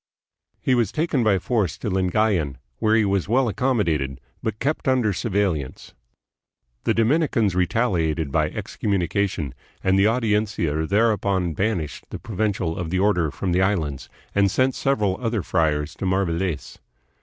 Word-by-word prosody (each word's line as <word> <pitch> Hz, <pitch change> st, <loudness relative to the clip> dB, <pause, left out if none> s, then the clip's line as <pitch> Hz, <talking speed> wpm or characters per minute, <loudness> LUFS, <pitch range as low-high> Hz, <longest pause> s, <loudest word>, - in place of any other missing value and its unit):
He 130 Hz, -, +2 dB
was 120 Hz, -5 st, +2 dB
taken 155 Hz, -5 st, 0 dB
by 105 Hz, -3 st, +3 dB
force 95 Hz, -3 st, -1 dB
to -, -, -5 dB
Lingayan, 95 Hz, -, +1 dB, 0.2 s
where 110 Hz, 0 st, +3 dB
he 110 Hz, -2 st, +3 dB
was 100 Hz, -1 st, 0 dB
well 130 Hz, +2 st, +3 dB
accommodated 85 Hz, -, 0 dB, 0.2 s
but 110 Hz, -1 st, -3 dB
kept 140 Hz, +5 st, -2 dB
under 125 Hz, -6 st, +2 dB
surveil 100 Hz, -3 st, +1 dB
lance. 65 Hz, -, -11 dB, 0.9 s
The -, -, +2 dB
Dominicans 115 Hz, -, +2 dB
retaliated 90 Hz, -, 0 dB
by -, -, +1 dB
excommunication, 95 Hz, -, -2 dB, 0.3 s
and 95 Hz, 0 st, +3 dB
the 100 Hz, -, +5 dB
Audiencia 105 Hz, -9 st, 0 dB
thereupon 100 Hz, -4 st, +1 dB
banished 85 Hz, -6 st, -2 dB
the -, -, -5 dB
provincial 100 Hz, -6 st, -2 dB
of 85 Hz, -2 st, -3 dB
the 90 Hz, -, 0 dB
order 90 Hz, -5 st, +2 dB
from 90 Hz, +5 st, -3 dB
the 90 Hz, +2 st, +2 dB
Islands, 80 Hz, -9 st, -1 dB, 0.2 s
and 100 Hz, -1 st, +3 dB
sent 130 Hz, +6 st, +2 dB
several 105 Hz, -9 st, 0 dB
other 115 Hz, -5 st, -1 dB
friars 75 Hz, -5 st, 0 dB
to 95 Hz, -, -2 dB
Mariveles. 90 Hz, -4 st, -1 dB
100 Hz, 145 wpm, -23 LUFS, 85-110 Hz, 0.9 s, the